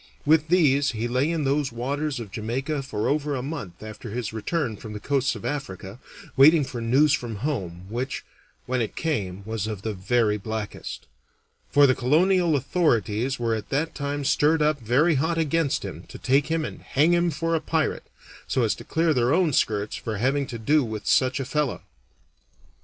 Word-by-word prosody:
With 155 +1 +4
these 145 -6 +3
he 115 +1 -2
lay 130 +5 +1
in 165 -2 -1
those 140 -1 0
waters 135 +4 -2
of 110 -4 -7
Jamaica 130 +8 -2
for 110 -6 -3
over 145 0 0
a 125 - -3
month 130 - -6
after 110 +2 -8
his 115 0 -4
return 120 +1 -2
from 105 +1 -9
the 105 - -5
coasts 135 +4 0
of - - -8
Africa, 120 -8 -5 0.4
waiting 150 +3 +7
for 125 -3 -5
news 135 +6 +4
from 120 -3 -2
home, 90 - -3
which, 120 +6 -4 0.4
when 130 0 0
it 110 - -3
came, 100 - -2
was 110 -1 -3
of 105 -3 -5
the 110 - -2
very 105 +2 +1
blackest; 110 0 -6 0.6
for 145 0 +6
the 130 - +5
colonial 170 +6 +3
authorities 130 - +1
were 115 -1 0
at 110 -1 -4
that 150 +4 -1
time 145 0 -3
stirred 150 +3 +3
up 150 -1 +2
very 135 +9 +3
hot 165 +2 0
against 155 -2 0
him - - -7
to - - -10
take 135 +2 +2
him 160 -1 0
and - - -8
hang 150 +5 +2
him 175 0 +3
for 165 +2 -2
a 160 - +1
pirate, 160 -1 -1 0.4
so 130 - +1
as 110 - +2
to - - -10
clear 165 0 +1
their 125 -1 +2
own 165 -1 +3
skirts 105 -3 0
for 110 -2 -4
having 135 +5 +1
to 120 - -6
do 145 +6 +2
with 110 -3 -5
such 130 0 +2
a 135 - -2
fellow. 145 -3 -1
135 Hz, 190 wpm, -25 LUFS, 115-150 Hz, 0.6 s, waiting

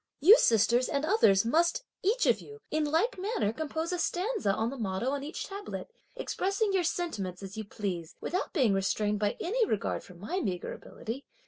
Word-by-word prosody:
You 390 - +8
sisters 235 +3 +4
and 280 +2 0
others 230 - +4
must, 340 - +2 0.2
each 450 +6 +2
of - - +3
you, 435 - -11
in 310 0 +1
like 355 +10 +1
manner 390 - 0
compose 315 +5 -3
a 355 - -1
stanza 375 - 0
on 225 +4 -1
the - - -5
motto 210 +4 -1
on 280 -1 -2
each 305 +4 -5
tablet, 405 +4 -7 0.2
expressing 395 +2 -1
your 375 -2 +2
sentiments, 200 - -2
as 195 +1 -7
you 220 0 -5
please, 185 -6 -4
without 365 +4 -2
being 255 - +3
restrained 205 +2 0
by 205 -1 0
any 460 +7 +1
regard 210 - -1
for 180 - -14
my 215 - -3
meagre 185 - -3
ability. 240 +6 -7
285 Hz, 190 wpm, -30 LUFS, -, 0.2 s, You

